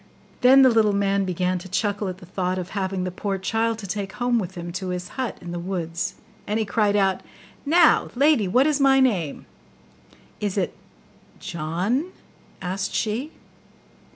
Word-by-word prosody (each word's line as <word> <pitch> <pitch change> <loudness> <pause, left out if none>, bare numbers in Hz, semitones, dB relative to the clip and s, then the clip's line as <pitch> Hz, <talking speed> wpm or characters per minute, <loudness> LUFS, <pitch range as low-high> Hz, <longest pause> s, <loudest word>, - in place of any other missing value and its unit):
Then 265 +2 +7
the 260 - +7
little 220 -2 +3
man 200 0 +1
began 180 0 -1
to 190 +2 -11
chuckle 205 +1 -1
at 185 -1 -5
the 185 - -13
thought 185 0 -2
of 180 -1 -4
having 190 -2 -2
the 185 - -3
poor 195 +2 -3
child, 225 +4 0
to 215 - -8
take 195 0 -4
home 245 -1 +1
with 190 -2 -5
him 175 0 -6
to 185 +2 -4
his 180 0 -4
hut 260 -3 -4
in 175 - -7
the 175 - -4
woods; 170 -2 -3 0.3
and 210 - 0
he 220 - 0
cried 205 0 +1
out, 195 -2 +2 0.5
'Now, 340 +4 +5
lady, 275 -6 +4
what 250 +9 +3
is 300 -2 +2
my 270 -1 +5
name?' 195 - 0 0.9
'Is 205 -1 -2
it 185 - -1 0.6
JOHN?' 185 - -2 0.5
asked 190 +2 -3
she. 235 +8 -1
195 Hz, 175 wpm, -24 LUFS, 185-230 Hz, 0.9 s, Then